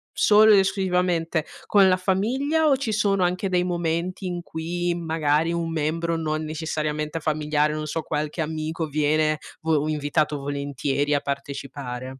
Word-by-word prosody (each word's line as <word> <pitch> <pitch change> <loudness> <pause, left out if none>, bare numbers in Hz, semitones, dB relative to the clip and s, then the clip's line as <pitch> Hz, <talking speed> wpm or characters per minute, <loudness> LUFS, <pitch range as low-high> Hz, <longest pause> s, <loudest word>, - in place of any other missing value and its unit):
solo 215 +1 +6
ed 200 - +7
esclusivamente 180 -4 0 0.2
con 200 -2 +5
la 185 - +3
famiglia 255 +12 +1
o 275 - +4
ci 255 -4 -2
sono 200 -3 +2
anche 180 +2 0
dei 180 -1 +2
momenti 175 +1 -2
in 175 -1 -4
cui, 175 +2 -2
magari, 160 -1 +1
un 170 -1 -2
membro 165 +2 -1
non 155 -1 -2
necessariamente 155 0 -3
familiare, 150 -1 0
non 155 0 -4
so, 160 +1 -3
qualche 150 +3 -3
amico 160 +1 -3
viene 155 +1 +1 0.2
vo 155 -2 +1
invitato 150 0 0
volentieri 140 0 -1
a - - +2
partecipare? 135 -2 -6
160 Hz, 150 wpm, -24 LUFS, 150-180 Hz, 0.2 s, ed